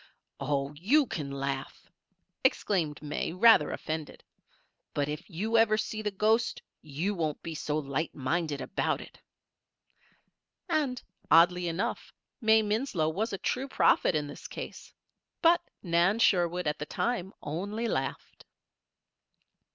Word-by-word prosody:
"Oh, 140 -1 -1
you 240 - +3
can 150 - -4
laugh!" 140 -1 -4 0.6
exclaimed 160 -7 +1
May, 150 +2 -3
rather 185 -4 +6
offended. 155 -1 -5 0.7
"But 145 -1 +1
if 150 +5 -6
you 215 +6 +1
ever 215 -1 +4
see 215 0 -3
the 210 - -1
ghost 215 +4 +1 0.2
you 155 +7 -2
won't 160 -5 -2
be 165 - -5
so 150 -1 -2
light 145 +2 -2
minded 150 +1 -1
about - - -1
it." - - -12 1.5
And, 275 -5 0 0.3
oddly 175 +3 +5
enough, 170 +3 -3 0.3
May 220 -1 +5
Winslow 210 - 0
was 210 +8 -2
a 195 - -2
true 260 +7 -2
prophet 220 - +3
in 150 -1 0
this 145 - -9
case; - - -8 0.5
but 340 0 +5 0.2
Nan 175 +3 +3
Sherwood, 180 -5 +2
at 150 0 -1
the 150 - -4
time, 195 -3 -1
only 205 +9 -3
laughed. 135 -10 -4
175 Hz, 130 wpm, -29 LUFS, 150-215 Hz, 1.5 s, rather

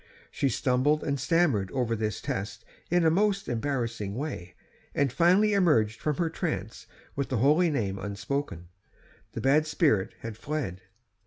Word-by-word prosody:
She 140 - 0
stumbled 130 +5 +1
and 140 -2 -1
stammered 140 - +2
over 120 -3 0
this 110 -2 -3
test 100 +3 -4 0.2
in 175 -1 +3
a 160 - +5
most 200 +2 +1
embarrassing 115 -5 -2
way, 120 - -5 0.4
and 140 -4 +1
finally 190 +7 +4
emerged 120 - +2
from 150 -1 0
her 170 - +1
trance 110 - -4 0.3
with 140 -1 -2
the 130 - 0
holy 150 +9 +4
name 100 -10 -2
unspoken; 100 - -4 0.6
the - - -4
bad 150 +4 +3
spirit 145 - +1
had 115 -2 -6
fled. 130 - -4
135 Hz, 150 wpm, -28 LUFS, 110-155 Hz, 0.6 s, a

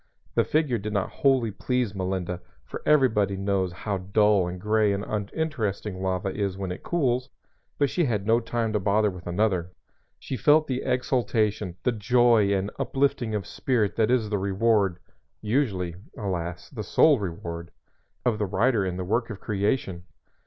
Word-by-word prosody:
(The - - +3
figure 150 -7 +1
did 105 +1 -5
not 100 -2 -1
wholly 130 -5 +2
please 125 +1 -1
Melinda, 95 -2 -3 0.2
for - - -7
everybody 110 -10 +3
knows 95 -2 0
how 100 +2 -3
dull 100 0 +3
and 90 +1 -5
gray 105 +1 +2
and 100 +1 -3
uninteresting 105 - -3
lava 95 0 -1
is 100 -2 -2
when 95 -2 -4
it 90 - -6
cools, 130 -6 0 0.5
but 145 - +3
she 170 +5 0
had 105 -6 -1
no 115 +2 +4
time 115 -1 -2
to 105 - +2
bother 105 +2 +2
with 90 -1 -10
another.) 90 -1 0 0.5
She 130 - -5
felt 150 +7 +5
the 130 -3 -2
exultation, 110 -7 0
the 125 - +2
joy 115 -1 +3
and 100 +1 0
uplifting 135 -4 0
of 100 -3 -2
spirit 110 +1 0
that 110 -1 +3
is 115 -4 +1
the 105 - +1
reward 100 -1 +2 0.4
usually, 105 -7 0 0.2
alas, 90 -5 -4
the 120 -6 -5
sole 145 +5 +4
reward 85 -3 -5 0.6
of 120 -3 +1
the 105 - 0
writer 105 +3 +2
in 90 -1 -3
the 90 - -3
work 115 +5 0
of 105 -3 -6
creation. 100 -3 -1
105 Hz, 165 wpm, -26 LUFS, 95-120 Hz, 0.6 s, felt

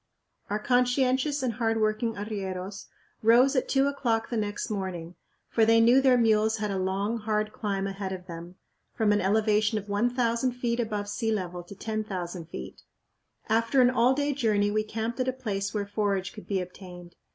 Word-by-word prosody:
Our 205 - 0
conscientious 255 +4 +1
and 245 -3 0
hard 225 0 0
working 215 +1 0
arrieros 200 -2 -5 0.3
rose 245 +5 +5
at 255 - 0
two 270 0 +3
o'clock 245 -5 0
the - - -1
next 210 +1 -2
morning, 180 -4 -4 0.3
for 225 - +2
they 225 +1 +5
knew 240 +4 +6
their 260 -2 +5
mules 220 -1 +3
had 210 -1 -2
a 195 - -1
long, 200 +5 -1
hard 215 0 -1
climb 200 -3 -2
ahead 195 -1 -4
of 185 -1 -6
them, 170 +1 -9 0.4
from 215 -2 +2
an 205 - +2
elevation 215 +2 +2
of 205 0 -6
1000 240 +3 +1
feet 240 -1 -2
above 210 -3 -2
sea 220 +2 -1
level 180 -4 -3
to 175 +3 -12
10,000 190 -6 -4
feet. - - -8 0.7
After 230 +4 +2
an 250 -1 +6
all 250 +1 +3
day 290 +1 0
journey 210 -6 +1
we 215 +1 +1
camped 225 +3 -4
at 255 - 0
a - - +2
place 200 -6 -3
where 205 -2 -2
forage 200 -2 -1
could 215 - -11
be 195 -2 0
obtained. 180 -1 -10
215 Hz, 185 wpm, -27 LUFS, 200-235 Hz, 0.7 s, knew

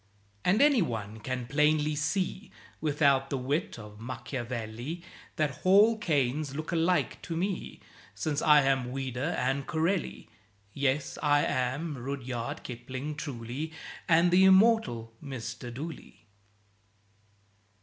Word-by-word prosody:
And 210 +9 +4
anyone 115 - +1
can 125 +2 -3
plainly 150 +3 +2
see, 180 +6 -1 0.3
Without 140 -3 +2
the 140 - -1
wit 135 +4 -2
of 105 -2 -11
Machiavelli, 120 +4 -5 0.3
That 150 -4 -1
"Hall 205 +5 +6
Caines 145 -5 0
look 155 +3 -4
alike 175 +1 +1
to 165 - -4
me," 190 +2 -3 0.3
Since 145 +9 -1
I 150 -2 +6
am 135 -2 +1
Ouida 135 +3 -2
and 135 +2 -1
Corelli. 165 +4 -1 0.5
Yes, 140 +1 -1
I 145 -1 +3
am 135 +4 -1
Rudyard 125 -2 -4
Kipling, 130 +4 -5
truly, 140 +1 -5 0.4
And 170 +1 +5
the 185 +2 +6
immortal 190 - +4
Mr. 120 -3 -6
Dooley. 145 -2 -8
140 Hz, 115 wpm, -29 LUFS, 125-160 Hz, 0.5 s, Hall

